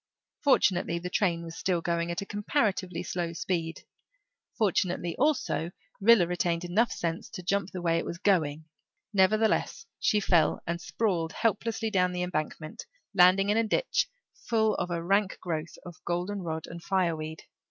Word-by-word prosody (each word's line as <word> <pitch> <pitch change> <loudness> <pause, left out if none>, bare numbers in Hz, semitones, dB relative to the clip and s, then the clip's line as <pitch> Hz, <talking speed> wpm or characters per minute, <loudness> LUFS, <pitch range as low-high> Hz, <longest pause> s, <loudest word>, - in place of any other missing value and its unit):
Fortunately, 185 - +3
the 180 +1 -5
train 175 -5 +1
was 165 -1 -8
still 180 -2 +1
going 170 0 -1
at 170 +3 -2
a - - -10
comparatively 200 - -1
slow 170 -1 -3
speed; 165 -1 -3 0.7
fortunately 180 -5 0
also, 270 - +1 0.3
Rilla 215 -3 +6
retained 175 0 -1
enough 210 +7 +2
sense 165 0 -3
to 180 - -8
jump 195 0 0
the 180 -3 -6
way 165 -1 +2
it - - -4
was 170 - -5
going; 160 -6 +1 0.5
nevertheless, 215 +3 +2
she 210 - +3
fell 170 -6 +3
and 170 +1 -3
sprawled 175 -7 -1
helplessly 225 0 0
down 180 -2 +2
the 180 0 -1
embankment, 155 - -4 0.3
landing 190 +1 +5
in 210 - +3
a 225 - +4
ditch - - +1 0.3
full 225 - +1
of 180 - -2
a 170 -1 -2
rank 195 +2 +1
growth 165 -2 -4
of 175 -3 -11
golden 180 +4 -2
rod 160 -2 -4
and 170 0 -9
fireweed. 165 -4 -1
180 Hz, 160 wpm, -28 LUFS, 170-205 Hz, 0.7 s, Rilla